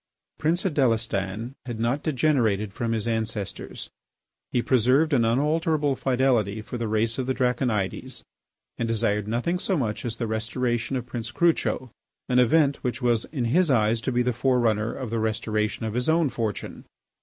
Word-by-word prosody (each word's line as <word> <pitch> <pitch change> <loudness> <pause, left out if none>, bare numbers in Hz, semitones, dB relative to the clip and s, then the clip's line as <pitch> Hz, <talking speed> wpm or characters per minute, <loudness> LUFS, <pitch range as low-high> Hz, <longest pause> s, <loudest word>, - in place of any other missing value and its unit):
Prince 170 +4 +1
Adélestan 115 - 0
had 120 -3 -4
not 120 +5 0
degenerated 120 -9 +1
from 115 +2 -2
his 110 -1 -1
ancestors. 110 -3 -3 0.6
He 120 - +1
preserved 130 +5 +3
an 120 -4 +4
unalterable 150 +4 +1
fidelity 120 -6 +1
for 125 - -6
the 115 - -1
race 110 +3 0
of 130 - -2
the 130 - 0
Draconides 125 -6 -1 0.6
and 115 - 0
desired 105 -2 0
nothing 125 +11 -1
so 190 0 0
much 110 -7 -2
as 115 -1 -3
the 120 - -2
restoration 115 +3 -1
of 125 -2 -3
Prince 120 -2 -5
Crucho, 145 -5 +1 0.4
an 125 0 +4
event 140 +3 +4
which 125 0 -4
was 120 -2 +2
in 130 -6 -3
his 165 +8 +3
eyes 115 -3 +3
to 130 - -1
be 125 0 +2
the 125 0 0
fore 125 +2 +2
runner 110 -1 +1
of 130 -5 -6
the 115 - 0
restoration 110 0 -1
of 110 - -3
his 125 +5 0
own 160 -2 +3
fortune. 110 -3 -4
120 Hz, 170 wpm, -25 LUFS, 110-135 Hz, 0.6 s, an